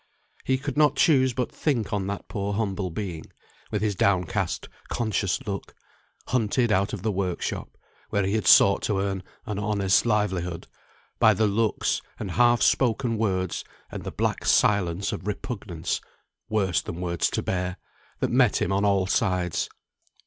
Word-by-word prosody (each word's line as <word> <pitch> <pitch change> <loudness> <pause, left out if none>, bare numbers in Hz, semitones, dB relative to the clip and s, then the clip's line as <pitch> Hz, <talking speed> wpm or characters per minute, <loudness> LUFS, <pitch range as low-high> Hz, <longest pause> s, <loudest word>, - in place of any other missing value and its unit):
He 130 - +1
could 140 +1 -5
not 150 -2 +4
choose 135 -4 +4
but 125 0 -2
think 120 -8 -1
on 100 -2 -1
that 100 0 -5
poor 100 0 -3
humble 100 -3 -1
being, 85 -3 -5 0.4
with 105 -1 -2
his 105 -2 +1
downcast 95 0 0 0.2
conscious 105 -5 -1
look; 100 -2 -5 0.5
hunted 120 0 +1
out 100 0 +2
of 100 - -6
the 110 - +1
work 95 -2 -2
shop, - - -5 0.3
where 100 -1 +1
he 100 - -1
had 110 -2 0
sought 100 - +7
to 105 -3 0
earn 95 -1 -1 0.2
an 105 -4 -3
honest 100 0 +2
livelihood, 95 -6 0 0.5
by 110 -1 +6
the 110 - +2
looks, 105 +1 +1 0.2
and 95 - -4
half 120 +3 +4
spoken 120 -1 +2
words, 95 -4 -1 0.3
and - - -6
the - - -4
black - - -1
silence 100 -2 +2
of 95 - -6
repugnance 100 -6 -3 0.5
(worse 95 - +1
than 80 - -7
words 85 -2 0
to - - -2
bear), 90 0 -2 0.4
that - - 0
met - - +4
him 90 - 0
on 100 +1 +1
all 100 -2 +3
sides. 90 -3 0
100 Hz, 165 wpm, -26 LUFS, 95-110 Hz, 0.5 s, sought